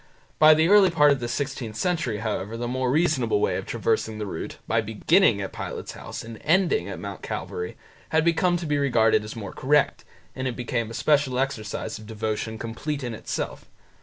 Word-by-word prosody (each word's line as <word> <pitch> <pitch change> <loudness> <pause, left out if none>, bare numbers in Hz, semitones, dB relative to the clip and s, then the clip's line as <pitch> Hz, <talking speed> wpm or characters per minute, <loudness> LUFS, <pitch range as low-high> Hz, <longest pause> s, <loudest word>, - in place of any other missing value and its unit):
By 155 0 +8
the 160 +1 +3
early 200 -1 +7
part 150 -3 +5
of 140 - +1
the 120 - -3
sixteenth 125 -3 -3
century, 165 - -1
however, 110 0 -3
the 120 +1 -3
more 130 +1 -1
reasonable 135 -7 +2
way - - +1
of - - -6
traversing 110 -1 -1
the 105 - -3
route, 90 -5 -6
by 115 0 +2
beginning 110 - +3
at 95 - -5
Pilate's - - -5
house - - -7
and 115 -1 -9
ending 190 - +2
at - - -5
Mount - - -7
Calvary, 445 0 -5 0.3
had 160 0 +2
come 175 0 +2
to 170 - -5
be 145 -2 0
regarded 115 -6 +3
as 105 - -7
more 105 -4 -6
correct, 145 +2 +2 0.3
and 130 0 -2
it 125 - -3
became 115 -2 -2
a 115 - -7
special 145 -3 +2
exercise 110 -5 -3
of 110 - -12
devotion 110 0 -3
complete 135 +6 -4
in 120 -2 -3
itself. 110 - -5
125 Hz, 195 wpm, -25 LUFS, 110-150 Hz, 0.3 s, By